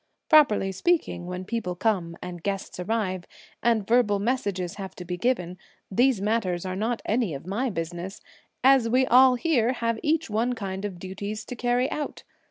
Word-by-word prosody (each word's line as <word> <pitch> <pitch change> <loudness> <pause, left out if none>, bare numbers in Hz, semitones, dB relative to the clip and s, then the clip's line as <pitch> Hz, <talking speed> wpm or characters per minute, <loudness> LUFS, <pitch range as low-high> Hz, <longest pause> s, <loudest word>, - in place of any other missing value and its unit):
Properly 245 - +5
speaking, 190 - 0
when 180 +1 -5
people 200 -5 -3
come 175 -4 0
and 180 -1 -7
guests 195 0 -4
arrive, 185 -2 -1 0.4
and 230 -4 +2
verbal 230 -3 +3
messages 200 -6 -2
have 195 -2 -7
to 180 - -8
be 180 +1 -3
given, 180 -4 -1 0.3
these 245 +2 +3
matters 195 -4 0
are 185 0 -3
not 225 +4 -2
any 220 - 0
of 135 - -8
my 225 +8 -1
business, 175 +1 -5 0.4
as 265 -3 +5
we 255 +2 +3
all 255 +1 +6
here 250 -4 +2
have 230 -2 -1
each 320 +2 +1
one 225 +4 0
kind 195 -3 -4
of 195 -3 -5
duties 200 +4 -6
to 250 - -6
carry 245 +2 +1
out. 300 - -4
210 Hz, 175 wpm, -26 LUFS, 185-245 Hz, 0.4 s, all